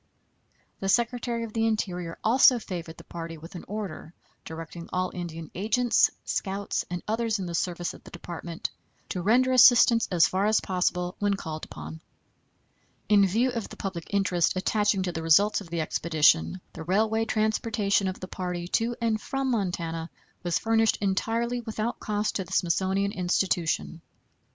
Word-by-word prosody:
The 195 - -2
Secretary 235 +1 +1
of 225 -2 -7
the 225 0 +1
Interior 180 -6 -2
also 250 +2 +6
favored 170 -7 -6
the - - -12
party 165 -1 -7
with 165 +5 -12
an 175 - -8
order, 195 -5 -6 0.3
directing 165 +1 -8
all 185 0 -1
Indian 165 -3 -6
agents, 225 +5 +3 0.2
scouts, 200 0 -2
and 175 -1 -4
others 225 0 0
in 190 - -4
the 170 - -5
service 175 0 -2
of - - -14
the - - -12
Department 170 -1 -6 0.4
to 180 - -3
render 245 +7 +3
assistance 240 -2 +6
as 175 -3 +5
far 195 +2 +1
as 215 0 +4
possible 180 -1 -1
when 205 -1 +1
called 155 -4 -6
upon. 80 +1 -9 1.1
In 200 -2 +6
view 235 +7 +1
of 230 -3 -4
the - - -11
public 185 -4 -5
interest 185 -4 +2
attaching 205 +1 +1
to 180 - -2
the 165 -1 -4
results 200 +7 +4
of 185 - -11
the 170 -1 -1
expedition, 160 +2 +2
the - - -8
railway 220 +6 +1
transportation 215 -2 +1
of 185 - -4
the 185 - -6
party 180 -2 -4
to 235 +4 0
and 225 -2 0
from 270 -1 -2
Montana 170 -6 -2 0.3
was 175 -2 0
furnished 225 -1 +2
entirely 230 +5 0
without 220 0 -3
cost 210 0 -1
to 195 - -2
the 180 - -15
Smithsonian 190 +3 +1
Institution. 175 -3 0
195 Hz, 165 wpm, -27 LUFS, 175-220 Hz, 1.1 s, also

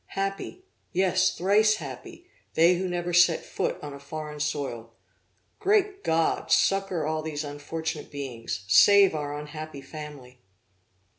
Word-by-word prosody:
Happy! 195 - -3 0.3
yes, 185 0 +2
thrice 210 +4 +4
happy, 135 -9 -9 0.3
they 170 +3 +6
who 185 +1 -2
never 175 0 -3
set 175 -1 +4
foot - - -2
on 145 -1 -6
a 140 - -9
foreign 150 +1 -7
soil! 135 -6 -3 0.6
Great 405 -1 +1
God! 160 0 0
succor 195 -5 +2
all 155 0 -1
these 155 -1 -4
unfortunate 150 +2 -5
beings; 120 -7 -6
save 195 - +7
our 145 -1 -3
unhappy 150 -1 -8
family!' 140 -4 -10
155 Hz, 130 wpm, -26 LUFS, 145-185 Hz, 0.6 s, save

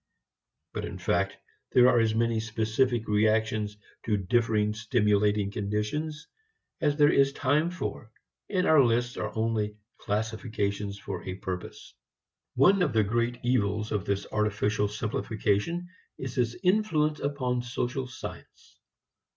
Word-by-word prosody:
But - - -3
in - - -5
fact 95 0 0 0.4
there 125 0 +7
are 125 -2 +5
as 110 -1 +2
many 115 0 +1
specific 115 +2 0
reactions 110 0 +1 0.3
to 105 -2 +1
differing 105 +1 +1
stimulating 105 -2 +1
conditions 105 +11 -3 0.6
as 145 -2 +2
there 145 -1 +6
is 140 0 +4
time 145 +5 +2
for, 165 -9 -5 0.4
and 185 -2 +1
our 155 -3 +6
lists 120 0 +1
are 110 - -3
only 110 -2 -1 0.2
classifications 105 -2 -2
for 95 -3 -6
a 95 - -5
purpose. 95 -1 -7 0.6
One 180 +9 +5
of 180 - +1
the 110 -1 +4
great 120 +3 0
evils 110 -3 +1
of 105 -3 -1
this 100 0 -1
artificial 105 0 +1
simplification 110 - -1 0.3
is 130 -1 -6
its 120 -3 0
influence 175 -6 +2
upon 130 -3 -1
social 125 +1 -3
science. 130 - -10
115 Hz, 130 wpm, -28 LUFS, 105-130 Hz, 0.6 s, there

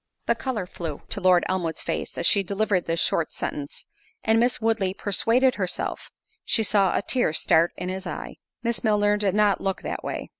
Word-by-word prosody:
The - - +3
colour 240 -8 -3
flew 165 -4 -6
to 200 - +1
Lord 185 -1 +5
Elmwood's 175 -4 -2
face, - - -4
as - - -1
she 200 - +5
delivered 200 -1 0
this 165 0 0
short 165 -1 +1
sentence; 145 0 -5 0.4
and 225 0 +3
Miss 245 +1 +2
Woodley 220 -4 0
persuaded 230 +7 +2
herself, 185 - -3 0.3
she 225 - +2
saw 200 -3 +2
a - - -1
tear 245 - +1
start 160 +1 +3
in 180 - -4
his 190 0 -4
eye. - - -6 0.3
Miss 235 -1 -1
Milner 210 -2 +3
did 205 -2 0
not 210 -2 +3
look 195 -1 -2
that - - -4
way. - - -5
200 Hz, 190 wpm, -25 LUFS, 180-220 Hz, 0.4 s, Lord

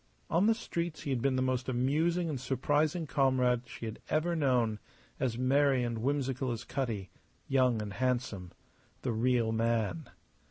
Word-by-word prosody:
On 180 +5 +4
the 225 - +4
streets 170 -6 -4
he 140 - -2
had 125 -3 0
been 135 0 +2
the 130 - +1
most 130 0 -1
amusing 155 +8 +1
and 140 -6 -3
surprising 145 +6 +1
comrade 130 -4 +2
she 115 - -8
had 110 -1 -6
ever 165 +3 +1
known, 125 -8 +1 0.4
as 120 -3 0
merry 135 0 +3
and 120 -2 -2
whimsical 135 0 -1
as 115 - -4
Cutty 115 -8 -3 0.4
young 130 -4 +3
and 100 -1 -6
handsome 120 -7 -1 0.5
the 125 - 0
real 115 0 +2
man. 110 -6 0
130 Hz, 160 wpm, -31 LUFS, 115-140 Hz, 0.5 s, On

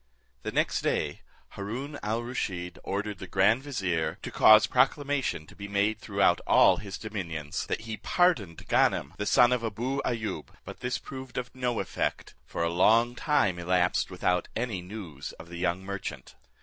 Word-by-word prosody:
The - - -4
next - - +1
day - - -1 0.3
Haroon 125 +9 -5
al 110 +3 -1
Rusheed 95 -8 -4
ordered 100 0 -3
the 95 - -7
grand 95 +7 +3
vizier, 95 - -1
to - - -5
cause 110 0 +7
proclamation 135 - +1
to - - -16
be 100 0 -7
made 100 +2 +1
throughout 100 -5 +2
all - - +6
his 100 -2 -6
dominions, 85 -9 -4
that - - -2
he 110 -1 -5
pardoned 130 - +1
Ganem - - +2
the 105 - -1
son 125 -2 +6
of 125 -2 +1
Abou 120 +5 -2
Ayoub; 110 -3 -3 0.2
but - - -9
this 125 +1 -1
proved 130 -2 -9
of 125 -1 -4
no 125 -2 -1
effect, - - -2
for - - -2
a 85 - +1
long 115 +7 +4
time 110 - +1
elapsed 90 +1 +1
without 90 -1 0
any 115 -6 -2
news 90 -7 -8
of 85 - -12
the 85 - -7
young 90 +1 0
merchant. 95 -9 -6
105 Hz, 170 wpm, -28 LUFS, 90-125 Hz, 0.3 s, cause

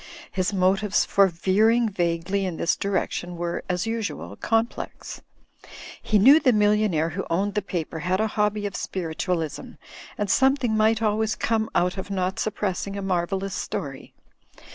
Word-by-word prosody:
His 185 0 -1
motives 195 +2 +2
for 195 -1 +4
veering 215 +7 +2
vaguely 175 0 -1
in 180 -4 -3
this 170 - +1
direc 200 -2 -1
tion 175 0 -5
were, 170 0 -3
as 180 +1 -1
usual, 225 -2 -4
complex. 225 +1 -2 0.8
He 215 - +2
knew 270 +10 +7
the 255 - +4
millionaire 210 -6 +2
who 185 +4 -4
owned 195 +5 0
the 210 - 0
paper 170 -4 -4
had 185 +4 0
a 220 - +2
hobby 210 -1 0
of 200 - -4
Spiritualism, 165 -2 -3 0.4
and 205 - -1
something 265 +1 +2
might 220 +1 +2
always 215 0 +1
come 220 -1 0
out 180 +2 +1
of 190 +1 -6
not 190 -1 -2
suppressing 200 -1 -2
a - - -3
marvellous 190 +1 -1
story. 135 -7 -5
195 Hz, 155 wpm, -24 LUFS, 180-215 Hz, 0.8 s, knew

